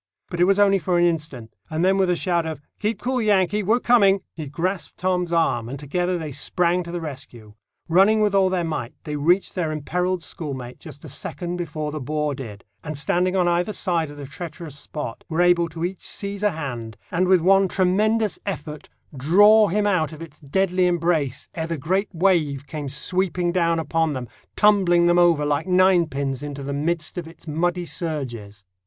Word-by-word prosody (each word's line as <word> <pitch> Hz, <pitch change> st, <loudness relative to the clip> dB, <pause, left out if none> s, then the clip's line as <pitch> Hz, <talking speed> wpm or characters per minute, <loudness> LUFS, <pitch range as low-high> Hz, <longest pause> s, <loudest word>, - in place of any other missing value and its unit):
But 175 Hz, -, -4 dB
it 175 Hz, -, +5 dB
was 195 Hz, +1 st, +3 dB
only 200 Hz, -1 st, +4 dB
for 175 Hz, +1 st, 0 dB
an 175 Hz, -, +4 dB
instant; 150 Hz, -9 st, -2 dB, 0.2 s
and 160 Hz, +2 st, 0 dB
then 190 Hz, +1 st, +4 dB
with 190 Hz, -2 st, +2 dB
a 180 Hz, -, +3 dB
shout 175 Hz, -1 st, 0 dB
of 160 Hz, -2 st, -5 dB, 0.2 s
"Keep 215 Hz, +2 st, -1 dB
cool, 255 Hz, 0 st, 0 dB
Yankee; 210 Hz, -1 st, +2 dB
we're 220 Hz, +5 st, +2 dB
coming!" 200 Hz, -6 st, +4 dB
he 155 Hz, -3 st, -6 dB
grasped 170 Hz, +3 st, -3 dB
Tom's 180 Hz, -1 st, 0 dB
arm, 140 Hz, -9 st, +1 dB
and 140 Hz, -, -5 dB
together 175 Hz, +6 st, -1 dB
they 155 Hz, -3 st, -5 dB
sprang 175 Hz, +5 st, 0 dB
to 170 Hz, -1 st, -7 dB
the 175 Hz, -, -3 dB
rescue. 130 Hz, -8 st, -9 dB, 0.3 s
Running 195 Hz, +6 st, +4 dB
with 210 Hz, -2 st, +2 dB
all 195 Hz, -1 st, +4 dB
their 185 Hz, -2 st, 0 dB
might, 145 Hz, -8 st, -4 dB
they 150 Hz, -, -4 dB
reached 175 Hz, +6 st, +2 dB
their 170 Hz, -4 st, -1 dB
imperilled 180 Hz, +4 st, -2 dB
schoolmate 130 Hz, -8 st, -7 dB
just 145 Hz, -, -11 dB
a -, -, -7 dB
second 175 Hz, +5 st, -5 dB
before 155 Hz, -3 st, -4 dB
the 155 Hz, -, -4 dB
bore 150 Hz, +2 st, -2 dB
did, 110 Hz, -7 st, -8 dB, 0.2 s
and 150 Hz, -2 st, -5 dB
standing 180 Hz, +6 st, +1 dB
on 180 Hz, -2 st, +2 dB
either 175 Hz, +4 st, +1 dB
side 170 Hz, -7 st, -1 dB
the 145 Hz, -1 st, -8 dB
treacherous 160 Hz, +1 st, -8 dB
spot 145 Hz, -4 st, -6 dB
were 160 Hz, 0 st, -2 dB
able 175 Hz, -1 st, +4 dB
to 165 Hz, +1 st, -4 dB
each 185 Hz, +1 st, -5 dB
seize 200 Hz, 0 st, -4 dB
a 210 Hz, -, +3 dB
hand, 125 Hz, -, -6 dB
and 180 Hz, +2 st, +1 dB
with 185 Hz, -2 st, +5 dB
one 195 Hz, +2 st, +4 dB
tremendous 210 Hz, +4 st, +1 dB
effort 150 Hz, -6 st, -6 dB, 0.3 s
draw 205 Hz, +10 st, +6 dB
him 205 Hz, +3 st, 0 dB
out 180 Hz, -7 st, +1 dB
of 155 Hz, -, -10 dB
its 155 Hz, -2 st, -13 dB
deadly 180 Hz, +5 st, +1 dB
embrace 165 Hz, -6 st, 0 dB
ere 160 Hz, -1 st, -3 dB
the 165 Hz, -1 st, -3 dB
great 190 Hz, +8 st, 0 dB
wave 160 Hz, -6 st, +1 dB
came 145 Hz, -2 st, -5 dB
sweeping 180 Hz, +4 st, 0 dB
down 170 Hz, -2 st, +1 dB
upon 160 Hz, -1 st, 0 dB
them, 130 Hz, -2 st, -5 dB, 0.3 s
tumbling 190 Hz, -5 st, +4 dB
them 175 Hz, 0 st, +4 dB
over 170 Hz, -4 st, +4 dB
like 145 Hz, +3 st, 0 dB
nine 185 Hz, -2 st, +4 dB
pins 135 Hz, -2 st, -3 dB
into 145 Hz, -1 st, -6 dB
the 140 Hz, +1 st, -4 dB
midst 155 Hz, +3 st, -2 dB
of 170 Hz, -, -7 dB
its 165 Hz, 0 st, -15 dB
muddy 175 Hz, +3 st, -1 dB
surges. 120 Hz, -, -5 dB
170 Hz, 195 wpm, -23 LUFS, 150-185 Hz, 0.3 s, draw